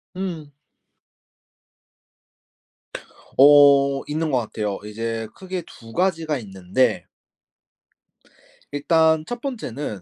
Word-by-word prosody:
음. 170 -6 -5 2.9
어. 140 -1 +6
있는 155 +1 -2
것 130 - +2
같아요. 105 -3 -4
이제 115 +1 -4
크게 185 -2 -6
2 115 -1 -14
가지가 165 -4 0
있는데 95 +3 -1 1.7
일단 160 +2 +2
1 240 0 -5
번째는 145 - -5
145 Hz, 140 characters per minute, -22 LUFS, 115-165 Hz, 2.9 s, 어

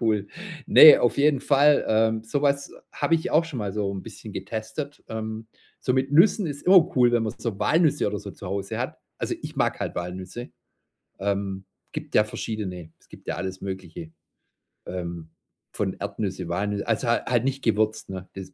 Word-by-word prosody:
Cool. 105 -4 +1 0.4
Ne, 155 - +10
auf 120 - +1
jeden 140 -2 +3
Fall, 145 +1 +4
ähm, 110 0 +2
so 140 +6 -2
was 140 0 +1 0.2
habe 165 - +1
ich 160 - -1
auch 160 +2 +4
schon 145 -7 -6
mal 100 -2 -3
so 105 -2 -1
'n 95 - -6
bisschen - - -10
getestet. 110 +7 -5
Ähm, 110 0 -5 0.3
so 125 - 0
mit 135 +2 0
Nüssen 190 +4 +5
ist 145 -1 -5
immer 185 -3 +6
cool, 120 -1 +5
wenn 120 -1 +3
man 110 - -2
so 110 -5 -4
Walnüsse 150 +5 +2
oder 105 0 -2
so 100 - -8
zu 95 - -11
Hause 100 +1 -3
hat. - - -4 0.2
Also - - -2
ich - - -7
mag - - 0
halt - - -3
Walnüsse. 95 +7 -6 0.7
Ähm, 100 -1 -2 0.3
gibt - - -7
ja 105 - +6
verschiedene. 95 -6 -5
Es - - -28
gibt - - -15
ja - - -2
alles 95 +1 -5
Mögliche, 90 -4 -7 0.7
ähm, 85 -3 -6 0.4
von - - -1
Erdnüsse, 95 -4 -4
Walnü 100 +3 -1
also 115 +1 -1
ha 120 - +1
halt 120 -1 +1
nicht 135 0 -2
gewürzt, 110 -2 0
ne? 95 -1 -7
Dies 95 -1 -9
110 Hz, 190 wpm, -25 LUFS, 95-135 Hz, 0.7 s, Ne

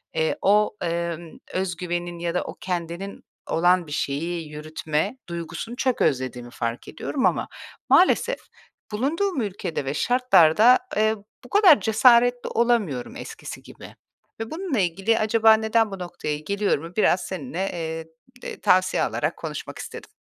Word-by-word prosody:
eee, 160 - 0
o, 210 +2 +3
emm, 170 -1 -3 0.2
öz 185 -1 -1
güvenin 175 -1 -4
ya 170 0 -2
da 180 - 0
o - - -8
kendinin 175 +2 -4 0.2
olan 175 +1 +2
bir - - -10
şeyi 155 +3 -2
yürütme 155 - -3
duygusunu 170 +7 -5
çok 255 -1 0
özlediğimi 125 -2 0
fark 115 -1 -4
ediyorum 265 -3 -3
ama - - +1 0.4
maalesef 470 +6 +4 0.5
bulunduğum 295 - 0
ülkede 185 -8 -4
ve 135 - -2
şartlarda, 245 - +5 0.2
eee, 220 +1 +3 0.3
bu - - -13
kadar 385 - +6
cesaretli 245 +3 +4
olamıyorum 215 - 0
eskisi - - -8
gibi - - -13 0.4
ve 225 0 -5
bununla 320 - -2
ilgili, 195 +5 +1
“Acaba 220 +1 +5
neden 220 0 +2
bu 195 - -6
noktaya 165 -4 -4
geliyorum?”u 175 -1 -2
biraz 190 -4 +3
seninle, 185 +2 -4 0.7
eee, - - -7
tavsiye 185 0 +3
alarak - - -1
konuşmak - - -6
istedim. - - -8
185 Hz, 135 wpm, -24 LUFS, 165-225 Hz, 0.7 s, kadar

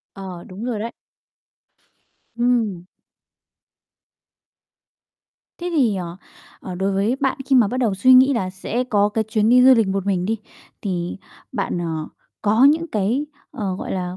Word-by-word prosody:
Ờ, 185 -3 -8
đúng 195 +5 -8
rồi 240 -4 -2
đấy. 230 +2 -4 1.4
Ừm. 230 -7 0 2.7
Thế 350 0 -4
thì, 230 -9 +3
ờ, 175 -1 -5 0.4
ờ, 185 - -7
đối 195 +2 -1
với 205 +7 +1
bạn 270 -1 0
khi 270 - +4
mà 230 -5 +5
bắt 250 - -3
đầu 235 -6 +1
suy 255 +7 +4
nghĩ 260 +2 +6
là 190 -7 -1
sẽ 225 +6 -3
có 205 -4 +2
cái 220 +1 -1
chuyến 220 0 +1
đi 250 +1 +6
du 260 0 +8
lịch 225 -3 +2
một 195 0 -2
mình 185 -2 0
đi, 225 +1 -1 0.4
thì 180 -3 -3 0.4
bạn, - - -2
ờ, 160 -2 -3 0.3
có 220 +4 +4
những 315 +4 +4
cái, 225 +8 0 0.2
ờ, 195 -3 -3
gọi - - -5
là, 180 -1 -3
210 Hz, 160 wpm, -21 LUFS, 190-245 Hz, 2.7 s, du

